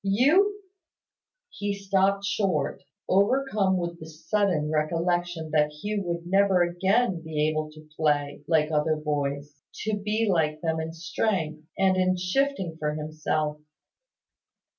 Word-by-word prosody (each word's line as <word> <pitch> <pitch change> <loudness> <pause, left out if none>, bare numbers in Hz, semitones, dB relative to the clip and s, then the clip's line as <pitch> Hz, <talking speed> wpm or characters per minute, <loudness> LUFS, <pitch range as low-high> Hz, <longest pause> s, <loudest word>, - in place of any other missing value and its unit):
You 330 - +3 0.4
" - - -64
He 205 0 -1
stopped 195 0 +1
short, 195 -6 0 0.3
overcome 200 -1 +2
with 170 -1 -4
the 160 - -9
sudden 165 -1 0
recollection 165 +1 -1
that 150 -1 +3
Hugh 205 +7 -3
would 170 0 -3
never 190 0 +4
again 190 +2 +1
be 155 -1 0
able 155 0 -1
to 155 0 -15
play 145 -2 0
like 160 -2 +2
other 155 +1 +2
boys, 145 -1 -3 0.2
to 215 0 0
be 210 +2 -1
like 155 -5 +1
them 160 -1 -1
in 160 0 -4
strength, 165 -2 -2
and 190 -1 +3
in 185 0 +2
shifting 185 -2 -1
for 150 0 -1
himself. 155 0 -2
175 Hz, 135 wpm, -26 LUFS, 155-200 Hz, 0.4 s, never